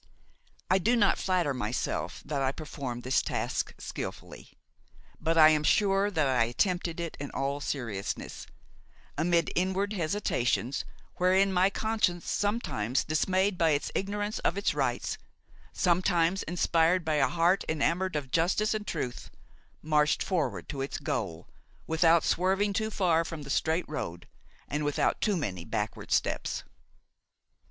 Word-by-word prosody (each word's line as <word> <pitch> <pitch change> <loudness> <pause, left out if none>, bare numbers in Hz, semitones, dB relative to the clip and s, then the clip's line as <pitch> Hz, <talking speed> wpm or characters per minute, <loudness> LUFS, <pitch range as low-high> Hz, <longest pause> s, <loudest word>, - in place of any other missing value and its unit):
I 185 - +3
do 230 +7 +2
not 205 -4 +3
flatter 180 -6 +1
myself 120 -1 -3
that 140 -1 -2
I 135 0 +2
performed 135 -5 -6
this 130 +1 +2
task - - -2
skilfully; - - -7 0.7
but 165 +1 0
I 155 -1 +9
am 155 -1 +2
sure 195 +3 +3
that 155 -8 +1
I 125 -3 +3
attempted 175 - -1
it 170 -2 -4
in 145 - -5
all 140 +1 -2
seriousness, 115 -9 -4 0.7
amid 170 +1 +1
inward 190 +3 0
hesitations 155 - 0 0.3
wherein 190 +2 +3
my 185 +1 +4
conscience, 210 -5 0
sometimes 145 - 0
dismayed 185 +5 +1
by 160 -3 +4
its - - -6
ignorance 205 +2 -2
of 180 - 0
its 200 - +1
rights, - - -1 0.5
sometimes 180 0 +2
inspired 170 +1 +2
by 155 -1 +1
a - - +4
heart 175 +3 +2
enamored 170 +4 0
of 135 -4 -3
justice 185 +8 +2
and 215 -1 -4
truth, 130 -6 -4 0.5
marched 150 -1 +2
forward 180 -5 -1
to 135 - -4
its 135 - -3
goal, 80 0 -3 0.4
without 165 +1 +4
swerving 195 +3 +1
too 220 +2 0
far 175 -6 +2
from 165 -2 -6
the 140 - -6
straight 160 +5 +1
road 85 - -5 0.4
and 150 +1 -2
without 145 -1 0
too 205 -4 +2
many 95 - -3
backward - - -4
steps. - - 0
165 Hz, 140 wpm, -29 LUFS, 145-190 Hz, 0.7 s, I